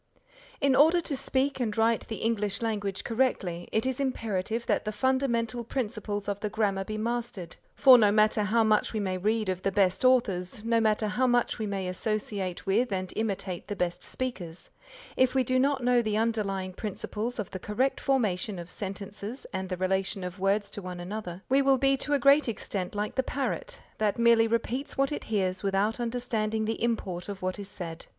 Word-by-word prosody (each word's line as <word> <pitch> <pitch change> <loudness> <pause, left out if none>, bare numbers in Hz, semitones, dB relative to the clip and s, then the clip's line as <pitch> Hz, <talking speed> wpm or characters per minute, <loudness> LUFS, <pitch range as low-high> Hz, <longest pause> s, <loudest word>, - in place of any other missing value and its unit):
In 275 -3 +3
order 320 +6 +6
to 320 -4 -3
speak 265 +1 0
and 225 -4 -1
write 225 0 +2
the 220 - -4
English 210 -2 0
language 205 -3 -2
correctly, 210 -8 -1
it 220 - +1
is 260 0 -1
imperative 230 -4 -2
that - - +1
the 215 - -2
fundamental 240 0 0
principles 210 -4 -3
of 200 -1 -2
the 210 - -2
Grammar 200 -3 0
be 215 +2 -5
mastered, 230 -5 -3 0.2
for 260 -3 +8
no 210 -2 +5
matter 215 0 +3
how 220 +2 +3
much 215 0 +2
we 220 - -1
may 185 -2 -2
read 215 +2 0
of 185 -1 -2
the 195 - 0
best 190 0 +2
authors, 215 -6 +2
no 230 0 +3
matter 215 0 +2
how 255 +5 +1
much 245 -1 +1
we 215 - -2
may 195 -2 -2
associate 195 -1 -2
with 220 +5 +2
and 185 -1 -2
imitate 195 -4 -3
the 205 - -3
best 180 -1 -2
speakers, 185 -10 -4 0.4
if 260 0 +3
we 260 - +4
do 255 +1 +1
not 270 -1 +1
know 245 0 +4
the 215 -2 -1
underlying 200 -4 -1
principles 215 +4 -4
of 215 -5 -4
the 185 - -5
correct 250 +8 0
formation 215 -7 0
of 175 0 -7
sentences 200 +4 -6
and 190 0 -3
the 185 - -2
relation 190 +1 -1
of 180 +1 -6
words 200 +2 +1
to 205 - -6
one 180 -1 -6
another, 180 0 -6
we 270 +2 +4
will 270 -1 +4
be 275 +1 +3
to 290 +2 -2
a - - +5
great 280 -1 +5
extent 195 -3 -4
like 210 +1 -2
the 260 - +1
parrot, 280 - -3 0.2
that 215 0 +1
merely 235 -1 +5
repeats 230 +4 -2
what 275 +1 +2
it 295 - -4
hears 190 -4 0
without 200 +3 0
understanding 230 -3 -1
the 225 +1 -3
import 195 -6 -2
of 195 -2 -6
what 185 +2 -2
is 200 -1 -7
said. 170 -4 -7
215 Hz, 200 wpm, -28 LUFS, 195-245 Hz, 0.4 s, for